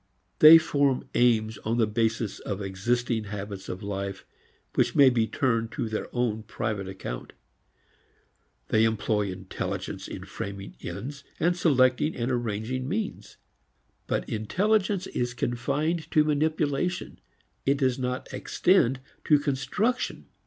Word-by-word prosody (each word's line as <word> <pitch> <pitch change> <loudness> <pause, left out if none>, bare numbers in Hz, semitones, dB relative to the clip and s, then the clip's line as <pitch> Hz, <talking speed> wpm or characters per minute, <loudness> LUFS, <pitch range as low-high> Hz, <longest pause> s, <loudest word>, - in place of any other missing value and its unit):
They 155 +2 +11
form 140 -4 +1
aims 110 -3 +2
on 115 +2 -1
the 115 - +4
basis 110 0 -1
of 100 -1 -4
existing 110 +4 -1
habits 100 -1 -6
of 95 +3 -5
life 100 -1 -4 0.5
which - - +1
may 135 -2 +7
be 115 -2 +1
turned 115 -3 0
to 120 - -2
their 110 0 -3
own 120 -3 0
private 105 -3 -3
account. 95 -10 -7 1.4
They 110 - +4
employ 110 -2 +1
intelligence 95 +1 -5
in - - -7
framing 100 0 -7
ends 130 +11 -6 0.2
and 175 +2 +2
selecting 140 -3 +3
and 120 +2 -1
arranging 120 +2 -2
means. 205 +3 -4 0.7
But - - -1
intelligence 190 - +1
is 125 -6 -3
confined 145 +8 -1
to 155 - +4
manipulation; 155 +2 0 0.5
it 140 +1 +4
does 130 -2 +1
not 125 0 -2
extend 135 -9 +2 0.2
to 150 - +6
construction. 145 - -1
120 Hz, 125 wpm, -27 LUFS, 110-145 Hz, 1.4 s, They